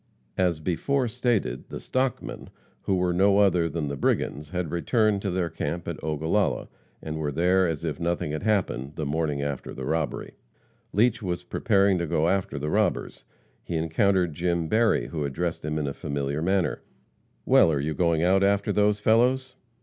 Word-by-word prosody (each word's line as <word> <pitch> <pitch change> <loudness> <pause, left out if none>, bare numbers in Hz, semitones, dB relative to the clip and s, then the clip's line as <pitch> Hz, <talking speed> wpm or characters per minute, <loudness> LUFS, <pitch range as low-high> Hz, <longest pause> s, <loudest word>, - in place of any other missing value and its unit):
As 90 -4 +2
before 125 - 0
stated, 115 - -1
the - - -6
"stockmen," 130 -2 -2 0.3
who 95 - 0
were 90 -1 +1
no 100 +3 +4
other 90 -5 +3
than 80 -2 -3
the 70 - -3
brigands, 70 +2 -1
had 90 -3 -3
returned 105 +3 +1
to 100 - -2
their 90 -2 -1
camp 80 +2 -4
at - - -5
Ogallala, 80 +6 0 0.3
and 80 0 -4
were 75 -2 -2
there 90 +5 +3
as 80 0 -3
if 75 -4 -3
nothing 85 -3 -1
had 75 - -3
happened, 95 -10 0
the 75 - -3
morning 75 -1 -1
after 70 -2 -4
the 65 - -5
robbery. 80 +1 -2 0.6
Leach 115 +2 +2
was 90 -3 -3
preparing 100 -2 +2
to 85 - -2
go 75 +2 +1
after 95 -6 -1
the 75 +2 -3
robbers. 105 -3 -1 0.4
He 85 - -4
encountered 85 +2 +1
Jim 85 +1 -1
Berry, 110 +5 +2
who 75 -3 -3
addressed 80 +5 -3
him 75 0 -2
in 75 - -1
a 70 - -3
familiar 70 +1 -3
manner: 95 -3 0 0.6
"Well, 80 - +5
are 75 - 0
you 75 +3 -1
going 85 -1 +1
out 95 +2 +4
after 100 0 +2
those 105 0 +2
fellows?" 125 +5 +2
85 Hz, 180 wpm, -26 LUFS, 75-100 Hz, 0.6 s, Well